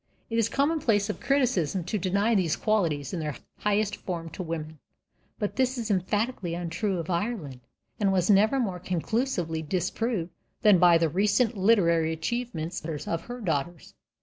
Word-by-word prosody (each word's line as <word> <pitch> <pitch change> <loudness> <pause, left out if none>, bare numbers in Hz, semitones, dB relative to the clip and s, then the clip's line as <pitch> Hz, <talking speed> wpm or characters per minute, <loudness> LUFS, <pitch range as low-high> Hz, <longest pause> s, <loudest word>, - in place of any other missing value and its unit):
It 230 - +1
is 225 - +3
a - - -12
commonplace 270 -8 +2
of - - -9
criticism 200 - +1
to 200 +5 -2
deny 200 +5 +1
these 180 -7 +2
qualities 170 -10 0
in 180 - -2
their 150 -3 -3 0.2
highest 205 0 0
form 165 -3 -5
to - - -6
women. 160 -2 -5 0.6
But 205 - -3
this 260 0 +1
is 230 -2 -2
emphatically 200 -1 -1
untrue 175 +3 -2
of 170 +1 -4
Ireland, 170 - -2 0.4
and 200 -2 +2
was 185 -2 +2
never 215 +6 +4
more 190 -7 -1
conclusively 180 - -1
disproved 185 +3 -2 0.3
than 205 -4 +6
by 175 -1 +7
the 165 0 +2
recent 205 - +2
literary 175 -6 +3
achievements 175 -1 -3
of 160 +1 -3
her 245 +1 -7
daughters. 165 -2 -3
190 Hz, 160 wpm, -27 LUFS, 165-220 Hz, 0.6 s, by